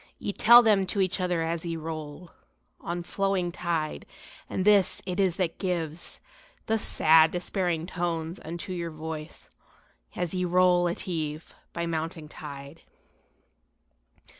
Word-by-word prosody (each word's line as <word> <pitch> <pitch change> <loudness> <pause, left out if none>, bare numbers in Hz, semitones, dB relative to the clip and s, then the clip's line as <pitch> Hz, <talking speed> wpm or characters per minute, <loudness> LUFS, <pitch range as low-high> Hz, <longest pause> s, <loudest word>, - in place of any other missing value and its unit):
Ye 200 - -4
tell 240 +4 +8
them 205 -4 +3
to 200 - -3
each 190 0 +1
other 180 -2 0
as 165 0 -2
ye 170 -1 -3
roll 160 +1 -7 0.5
On 175 0 -4
flowing 195 -1 -1
tide, 170 -3 -3 0.4
and 185 - -2
this 205 -3 +4
it 185 0 -3
is 190 -3 +2
that 180 -3 -2
gives 170 -3 -3 0.5
The 225 0 +1
sad 160 -4 +5
despairing 175 -1 -2
tones 170 -1 -3
unto 170 +3 -6
your 170 -1 -3
voice 155 0 -7 0.7
As 175 -1 -2
on 185 - -1
ye - - 0
roll 180 0 +4
at 170 - -4
eve 155 -3 -4 0.2
by 170 0 -3
mounting 160 -1 -3
tide." 140 +1 -9
170 Hz, 140 wpm, -27 LUFS, 160-185 Hz, 0.7 s, tell